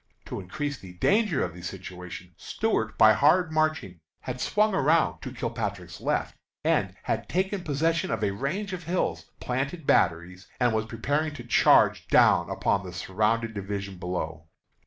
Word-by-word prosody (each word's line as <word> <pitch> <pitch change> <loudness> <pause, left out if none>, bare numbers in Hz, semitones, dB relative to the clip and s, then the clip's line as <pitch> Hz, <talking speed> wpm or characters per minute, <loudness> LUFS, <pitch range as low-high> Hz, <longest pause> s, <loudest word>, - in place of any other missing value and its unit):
To - - -5
increase 140 +9 -4
the 95 -2 -11
danger 200 - +2
of 85 - -7
the 90 - -11
situation, 90 -1 -8
Stuart, 110 - -2
by 110 0 +7
hard 160 +7 +3
marching, 155 - 0 0.2
had 125 -1 -5
swung 210 0 +2
around 160 0 +2
to 130 - -6
Kilpatrick's 105 -8 -4
left, - - -1 0.3
and - - +1
had - - -2
taken 190 +1 -1
possession 160 +2 0
of - - -2
a 100 - +2
range 170 - -3
of 180 -3 -6
hills, 180 +3 -2
planted 140 +6 -3
batteries, 90 0 +1
and 125 -2 +3
was 110 0 -1
preparing 145 +7 -1
to 120 - -8
charge 120 - +4
down - - +4
upon 100 - 0
the 90 -1 -8
surrounded 110 +5 0
division 100 -2 -5
below. 80 -3 -4
115 Hz, 155 wpm, -27 LUFS, 95-155 Hz, 0.3 s, by